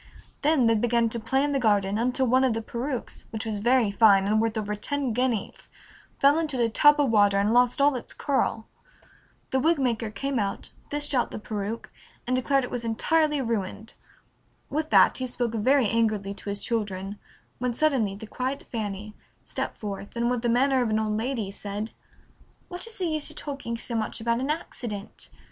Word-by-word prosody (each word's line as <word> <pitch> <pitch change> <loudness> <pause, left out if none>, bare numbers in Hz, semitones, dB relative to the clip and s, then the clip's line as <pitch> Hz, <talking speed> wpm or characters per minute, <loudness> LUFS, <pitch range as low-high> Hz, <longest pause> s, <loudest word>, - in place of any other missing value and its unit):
Then 295 -4 +3
they 230 - +5
began 235 +1 +2
to 235 - -3
play 265 +5 +1
in 290 - 0
the 275 - +1
garden 205 -3 +2
until 255 +2 +1
one 255 +2 +3
of 255 -3 +3
the 225 - -2
perukes, 245 +3 -4
which 220 0 -5
was 215 -2 -2
very 240 -1 +3
fine 200 -2 +5
and 215 +2 +2
worth 225 0 -1
over 210 -1 -2
ten 270 +3 -2
guineas, 245 -3 -2 0.5
fell 285 +3 +5
into 300 -6 -2
a 235 -1 +3
tub 295 +6 +5
of 280 -5 +3
water 205 -2 +4
and 205 +3 +2
lost 245 +2 +3
all 280 0 +4
its 245 - -5
curl. 265 -5 -1 0.9
The 265 - +2
wig 325 +4 +3
maker 235 -4 0
came 270 +4 -2
out, 200 -2 -3 0.2
fished 295 0 0
out 245 -3 +2
the - - -6
peruke, 215 +1 -5 0.3
and 255 - 0
declared 270 +1 +2
it 250 - -5
was 245 -1 -3
entirely 300 +6 +1
ruined. 220 -2 -3 0.8
With 310 +2 -1
that - - +5
he 255 - -2
spoke 240 -2 -2
very 255 +3 +3
angrily 215 -3 0
to 200 +1 -8
his 200 0 -2
children, 205 -3 -3 0.4
when 245 -1 -1
suddenly 250 -9 +1
the 215 +2 -9
quiet 260 +5 -4
Fanny 210 -2 -4 0.3
stepped - - -4
forth, 200 0 -6
and 235 +1 +1
with 245 -2 -1
the 240 - 0
manner 260 +2 +3
of 240 - 0
an 215 - +1
old 215 -1 0
lady 225 -3 -2
said, 205 +2 -5 0.8
"What 360 +4 -4
is 455 - -6
the 370 - -1
use 310 -3 0
of - - -4
talking 275 -5 -4
so 235 - -3
much 225 0 -1
about 235 +1 0
an 265 +3 -2
accident? 235 -9 -5
235 Hz, 200 wpm, -26 LUFS, 215-265 Hz, 0.9 s, they